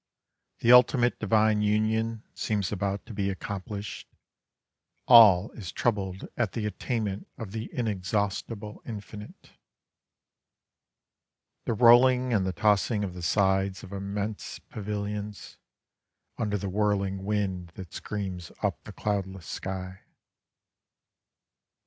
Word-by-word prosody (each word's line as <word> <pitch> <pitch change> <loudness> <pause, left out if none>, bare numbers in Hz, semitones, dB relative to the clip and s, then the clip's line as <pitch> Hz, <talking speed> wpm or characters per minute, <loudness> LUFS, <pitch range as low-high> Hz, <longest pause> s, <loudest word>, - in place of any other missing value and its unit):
The 120 - +5
ultimate 125 0 +5
divine 110 0 +3
union 110 +2 +1
seems 105 -4 -1
about 100 0 -2
to 115 - -9
be 100 -1 -1
accomplished, 100 +1 -6 1.0
All 110 -5 +8
is 95 -6 -8
troubled 95 -5 -1
at 110 -7 -1
the 110 - -2
attainment 105 -2 -3
Of 110 -4 -7
the 110 +1 -5
inexhaustible 105 0 -2
infinite. 105 -2 -9 2.1
The 115 - 0
rolling 125 +2 +6
and 95 -4 +2
the - - 0
tossing 105 +3 +2
of 95 -3 -3
the 90 - -8
sides 95 +1 +1
of 95 - -10
immense 100 +2 -4
pavilions 105 0 -6 0.8
Under 105 -2 -1
the 100 - -4
whirling 100 -1 0
wind 95 -3 -1
that 95 -3 -9
screams 95 -5 -5
up - - -1
the - - -9
cloudless 95 -4 -3
sky. 95 +1 -5
105 Hz, 110 wpm, -28 LUFS, 95-110 Hz, 2.1 s, All